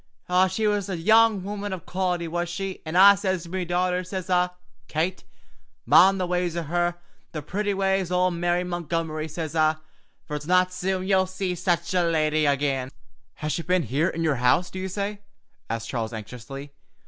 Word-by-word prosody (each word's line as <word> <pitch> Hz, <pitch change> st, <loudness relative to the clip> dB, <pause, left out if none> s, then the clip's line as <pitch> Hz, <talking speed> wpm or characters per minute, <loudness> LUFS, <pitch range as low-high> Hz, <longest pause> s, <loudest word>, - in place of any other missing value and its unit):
She 215 Hz, +4 st, -1 dB
was 205 Hz, -2 st, 0 dB
a 185 Hz, -, -2 dB
young 220 Hz, +2 st, +4 dB
wummun 205 Hz, +1 st, -4 dB
of 180 Hz, -4 st, -7 dB
quality, 180 Hz, -2 st, -1 dB
was 175 Hz, +1 st, -2 dB
she, 190 Hz, +2 st, -5 dB
an' 160 Hz, -, -4 dB
I 195 Hz, +2 st, +9 dB
sez 190 Hz, -3 st, -2 dB
to 170 Hz, -, -11 dB
me 185 Hz, 0 st, -2 dB
dauther, 180 Hz, +1 st, 0 dB
sez 185 Hz, 0 st, -5 dB
I, 180 Hz, 0 st, +3 dB, 0.4 s
'Kate, 170 Hz, +4 st, -2 dB, 0.6 s
mind 195 Hz, +1 st, +6 dB
the 185 Hz, -, 0 dB
ways 180 Hz, -1 st, -1 dB
o' 170 Hz, -, -1 dB
her, 175 Hz, +2 st, 0 dB, 0.4 s
the 155 Hz, -2 st, -5 dB
pretty 205 Hz, +5 st, -2 dB
ways 195 Hz, -2 st, 0 dB
o' 180 Hz, 0 st, +2 dB
Mary 175 Hz, +1 st, 0 dB
Montgomery,' 165 Hz, -3 st, -3 dB
sez 160 Hz, 0 st, -5 dB
I, 155 Hz, 0 st, +3 dB, 0.5 s
'fer 150 Hz, -, -8 dB
it's 150 Hz, +1 st, -9 dB
not 185 Hz, 0 st, +3 dB
soon 185 Hz, 0 st, -2 dB
ye'll 190 Hz, -1 st, +3 dB
see 185 Hz, 0 st, -3 dB
such 170 Hz, -1 st, -1 dB
a 180 Hz, -, +3 dB
lady 155 Hz, -2 st, +2 dB
agin.'" 140 Hz, -2 st, 0 dB, 0.5 s
"Has 155 Hz, 0 st, -3 dB
she -, -, -2 dB
been 180 Hz, +1 st, +1 dB
here 150 Hz, +6 st, 0 dB
in 165 Hz, -2 st, -2 dB
your 150 Hz, -5 st, +1 dB
house, 125 Hz, +9 st, +2 dB
do 185 Hz, -, -6 dB
you 190 Hz, -, -3 dB
say?" 200 Hz, +2 st, -3 dB, 0.5 s
asked 115 Hz, 0 st, -4 dB
Charles 115 Hz, -2 st, -3 dB
anxiously. 125 Hz, +6 st, -8 dB
180 Hz, 190 wpm, -25 LUFS, 160-190 Hz, 0.6 s, I